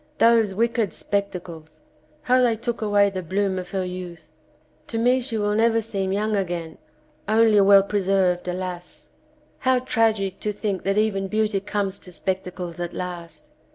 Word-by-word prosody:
Those 225 -4 +4
wicked 230 -3 0
spec 200 -1 -1
tacles! 160 -4 -10 0.4
How 255 +1 +3
they 240 -2 +3
took 235 +1 -4
away 205 -1 +3
the 185 -1 -4
bloom 190 +2 -1
of 180 - -7
her 190 -1 -2
youth. 175 -3 -8 0.6
To 225 - -4
me 245 +3 +3
she 240 -3 -3
will 205 0 0
never 225 +1 +3
seem 195 -4 -3
young 210 +2 0
again, 175 -4 -3 0.5
only 220 -1 +5
well 195 0 +7
preserved, 190 -3 +1
alas! 180 -1 -6 0.5
How 260 0 +3
tragic 220 -6 0
to 210 - -2
think 205 -2 -3
that 195 +1 +1
even 200 -2 +1
beauty 215 0 0
comes 200 0 -3
to 180 - -12
spectacles 180 -1 -4
at 175 -1 -4
last! 180 - -7
200 Hz, 160 wpm, -23 LUFS, 180-220 Hz, 0.6 s, well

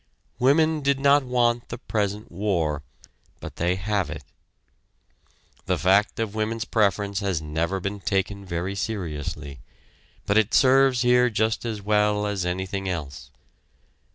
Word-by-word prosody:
Women 155 +4 +3
did 140 -1 +1
not 140 +1 +5
want 120 -2 0
the 120 - -5
present 105 -3 -3
war, 85 -6 -1 0.6
but - - -9
they 90 +2 +1
have 100 0 -1
it. - - -7 1.4
The - - +1
fact 100 +7 +2
of 110 -3 -2
women's 110 +1 -2
preference 100 -2 +1
has 100 -5 -1
never 80 +5 -2
been 100 +2 -4
taken 100 0 -1
very 90 +1 -3
seriously, 75 - -5 0.7
but 100 +2 +3
it 110 0 +1
serves 130 -2 +4
here 125 0 +4
just 110 +1 0
as 110 -3 -4
well 105 0 +2
as 100 -3 -2
anything 95 +2 -3
else. 75 -6 -5
105 Hz, 135 wpm, -24 LUFS, 95-115 Hz, 1.4 s, not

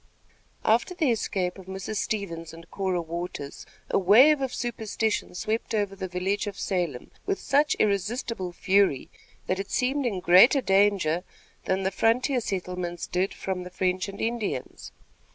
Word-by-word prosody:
After 235 +11 +2
the 315 -8 +2
escape 190 -4 -2
of 185 - -13
Mrs. 190 +3 -5
Stevens 165 -7 -3
and 165 0 -14
Cora 185 -3 -1
Waters, 165 -4 -6 0.2
a - - +2
wave 255 +11 +6
of 265 -2 -1
superstition 220 -5 -2
swept 220 +4 -2
over 205 -2 -1
the 190 -1 -4
village 190 +4 -1
of 200 - -5
Salem 175 -10 -2 0.2
with 395 -1 0
such 290 +2 +2
irresistible 205 -1 -1
fury, 190 -5 +2 0.3
that 185 - -1
it 195 0 -4
seemed 265 +3 0
in 200 -6 -2
greater 185 - +7
danger 195 -6 +2 0.4
than 190 0 0
the 190 - 0
frontier 250 +6 +2
settlements 180 -3 -4
did 185 +2 -1
from 190 -1 -4
the 180 - -7
French 185 +1 -1
and 200 - -9
Indians. 225 - -3
195 Hz, 150 wpm, -26 LUFS, 180-225 Hz, 0.4 s, greater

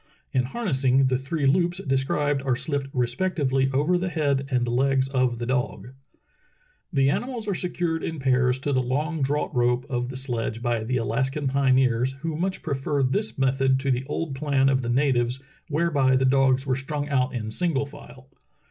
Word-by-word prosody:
In 125 -1 +1
harnessing, 135 - +1
the 130 -1 +2
three 140 +2 -2
loops 175 +5 +2
described 140 -2 0
are 135 -2 0
sHpped 140 0 -2
respectively 135 +1 0
over 150 +7 +2
the 185 +1 -2
head 140 -5 0
and 125 -2 +1
legs 135 +2 +2
of 130 -3 +1
the 120 - -4
dog. 125 -1 -2 1.0
The 135 -4 +3
animals 240 - -3
are 200 - 0
secured 175 -2 -2
in 160 - -3
pairs 130 -2 +2
to 145 0 -1
the 130 - +2
long 150 +6 -2
draught 145 +2 -1
rope 125 +1 +1
of 125 -1 -1
the 130 0 -6
sledge 120 -4 -2
by 120 -2 0
the 125 +3 -1
Alaskan 135 +5 -1
pioneers, 130 -2 +2
who 165 -1 -3
much 185 +4 -2
prefer 140 -1 -1
this 125 -3 0
method 135 0 +2
to 140 -1 0
the 125 0 0
old 150 0 -3
plan 135 -1 +2
of 135 -1 +2
the 120 - -3
natives 125 -1 +1 0.3
where 170 +3 0
by 135 -3 +3
the 130 0 +2
dogs 135 0 +3
were 130 -2 +1
strung 145 +2 -4
out 130 -2 0
in 110 -2 -4
single 145 0 0
file. 135 -2 -13
135 Hz, 185 wpm, -25 LUFS, 130-145 Hz, 1.0 s, The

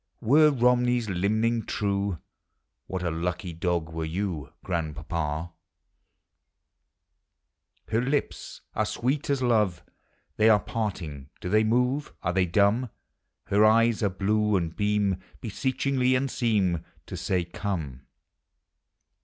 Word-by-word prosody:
Were 150 +6 +5
Komnev's 125 -2 +2
limning 110 +5 +1
true, 100 -2 -1 0.7
What 95 -1 -4
a 85 - 0
lucky 90 +1 -3
dog 85 -1 -1
were 80 0 -3
you, 80 -4 -3
Grandpapa! 80 -1 -3 2.4
II 110 - +4
er - - +1
lips 140 +3 -2
are - - 0
sweet 135 +4 -1
as 140 -2 +1
love; 105 -7 +2 0.5
They 110 +1 +5
are 105 -2 +6
parting! 85 -12 -4
Do 90 - -5
they 110 +3 +4
move 125 +6 +1
Are 90 - 0
they 95 -1 +2
dumb? 105 +7 +2 0.6
Her 100 +2 +3
eyes 115 +1 +4
are 100 - +2
blue, 105 +2 +1
and 85 -3 -1
beam 105 -2 +1 0.2
Beseechingly, 130 +2 0
and 135 +1 0
seem 100 -8 +1 0.2
To - - -7
say, 90 -2 0
" - - -10
Come 85 -8 -4
100 Hz, 125 wpm, -27 LUFS, 90-115 Hz, 2.4 s, are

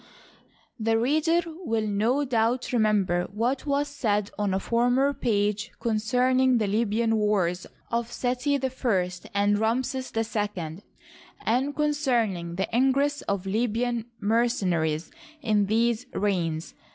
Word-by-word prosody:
The 225 0 +2
reader 310 +8 +2
will 315 -10 -3
no 225 +8 +1
doubt 245 +1 0
remember 205 -6 +2
what 245 +7 -1
was 285 +1 +1
said 210 -8 -1
on 205 -1 -1
a 190 - +1
former 245 +6 +2
page 210 -2 0
concerning 250 +3 +2
the 220 - +1
Libyan 225 +2 +1
wars 190 -4 0 0.2
of 235 0 -1
Seti 255 +3 0
I 245 -9 0 0.2
and 205 +1 +2
Ramses 255 +4 -1
II, 205 -7 -2 0.6
and 260 +5 +1
concerning 240 - 0
the 190 +2 -1
ingress 275 +3 +2
of 200 -2 -1
Libyan 230 +3 -1
mercena 215 -5 +1
ries 160 +1 -2 0.3
in 210 -3 +2
these 230 +3 +1
reigns. 170 -5 -1
225 Hz, 120 wpm, -26 LUFS, 205-255 Hz, 0.6 s, The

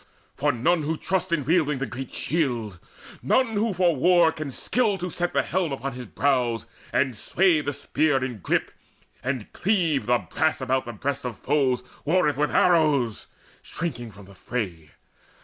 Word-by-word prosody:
For - - +1
none 165 +8 +1
who 155 +2 -2
trusts 185 0 -1
in 150 -5 0
wielding 150 -2 +2
the 135 - -2
great 130 0 -7
shield, 120 - -2 0.4
None 245 - +2
who 220 +2 +1
for 180 -3 +2
war 170 +3 +5
can 155 -3 -5
skill 215 - 0
to 180 -1 -4
set 175 +2 -1
the - - +1
helm 180 -4 -1
Upon 135 0 -4
his 125 -1 -8
brows, 125 -3 0 0.3
and 130 -3 +1
sway 170 - +2
the 145 0 -2
spear 145 -1 0
in 125 -5 -6
grip, - - 0 0.5
And 130 -4 -3
cleave 170 - +1
the 120 0 +4
brass 155 - -1
about 130 0 0
the 120 - -6
breasts 140 +6 -3
of 125 -3 -5
foes, 135 -3 +1 0.2
Warreth 155 -1 +2
with 150 0 +1
arrows, 150 - +2 0.3
shrinking 125 -9 -5
from 100 -1 -14
the 100 - -15
fray. 90 -7 -5
140 Hz, 170 wpm, -25 LUFS, 125-170 Hz, 0.5 s, war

